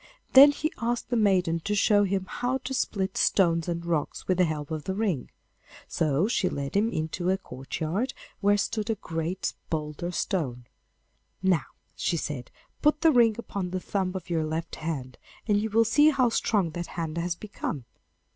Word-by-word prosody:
Then 275 +2 +11
he 310 +2 -2
asked 240 +1 -2
the - - +2
maiden 185 -6 +3
to 205 +5 -2
show 205 0 +4
him 190 -1 -1
how 250 +2 -1
to 265 - -4
split 195 -6 -1
stones 170 -4 +3
and 170 -1 -3
rocks 165 -4 -2
with 185 -1 +1
the 180 - +6
help 150 -2 -4
of 155 -1 -4
the 190 - -2
ring. 195 - -1 0.6
So 155 +3 +1
she 205 -5 +1
led 140 +3 -4
him 210 +3 +3
into 160 0 -2
a 190 - +2
courtyard 175 - -3 0.2
where 205 0 +3
stood 215 +2 -2
a 225 - +2
great 165 0 -3 0.2
boulder 155 +1 -3
stone. 140 - -2 0.8
'Now,' 185 -6 +2 0.3
she 170 - 0
said, 135 -6 -4 0.3
'put 300 +1 +3
the 325 -1 +6
ring 235 -5 +5
upon 200 -5 -4
the 185 +1 -2
thumb 185 0 -2
of 190 - -5
your 165 -2 0
left 160 +1 -4
hand, 135 -6 -5 0.3
and 205 -1 +3
you 220 - -2
will 225 +2 +4
see 295 +7 +5
how 260 -5 +3
strong 205 -6 +1
that 175 +1 -5
hand 165 -1 -4
has 170 0 -1
become. 170 - -5
185 Hz, 185 wpm, -27 LUFS, 160-215 Hz, 0.8 s, Then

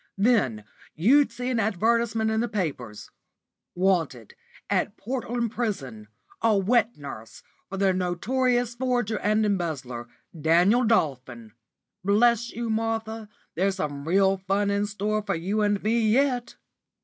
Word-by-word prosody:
Then 195 - +2 0.3
you'd 250 - +4
see 250 +2 -4
an 240 - 0
advertisement 220 +2 +1
in 220 - 0
the 240 - 0
papers, 140 - -4 0.6
'Wanted, 170 - 0 0.3
at - - -1
Portland 240 -1 -3
Prison, 135 - -4 0.3
a 225 -2 +3
wet 225 +3 +2
nurse 115 -6 -10 0.3
for 195 - -5
the 195 -1 +2
notorious 240 +7 0
forger 245 -3 -1
and 215 +1 +1
embezzler, 150 - -3 0.3
Daniel 175 - +3
Dolphin.' 130 - -1 0.5
Bless 235 +4 +3
you, 235 -1 -3
Martha, 225 -1 -2 0.2
there's 190 +3 0
some 145 -5 -4
real 195 +2 +3
fun 195 +2 0
in 200 +1 0
store 210 +1 -1
for 200 -2 -2
you 195 +6 -1
and 205 -1 +1
me 225 +2 +2
yet." 250 0 +1
205 Hz, 130 wpm, -25 LUFS, 175-230 Hz, 0.6 s, you'd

